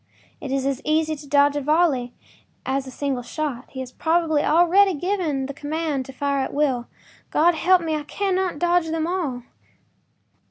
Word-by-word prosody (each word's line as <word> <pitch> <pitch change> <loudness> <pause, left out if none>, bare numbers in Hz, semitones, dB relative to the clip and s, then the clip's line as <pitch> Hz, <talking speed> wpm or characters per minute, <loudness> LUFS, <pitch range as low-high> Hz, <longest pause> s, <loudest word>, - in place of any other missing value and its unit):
It 275 - -5
is 270 -1 0
as 275 -1 -1
easy 310 +1 +1
to 290 0 -12
dodge 285 0 +4
a 290 - -1
volley 290 -4 +2 0.5
as 270 0 -1
a - - -6
single 270 -1 -2
shot. 275 -1 -4
He 260 - -6
has 255 -1 -7
probably 320 0 +1
already 350 +4 +4
given 320 -5 -1
the 280 - -6
command 290 -2 -3
to - - -8
fire 280 +1 -1
at 265 - -3
will. 265 -5 0 0.4
God 345 +3 +4
help 355 +2 +3
me, 320 -1 -1
I 305 - -2
cannot 375 +1 -1
dodge 345 +1 +2
them 320 0 -1
all! 320 -9 -2
300 Hz, 175 wpm, -23 LUFS, 270-335 Hz, 0.5 s, dodge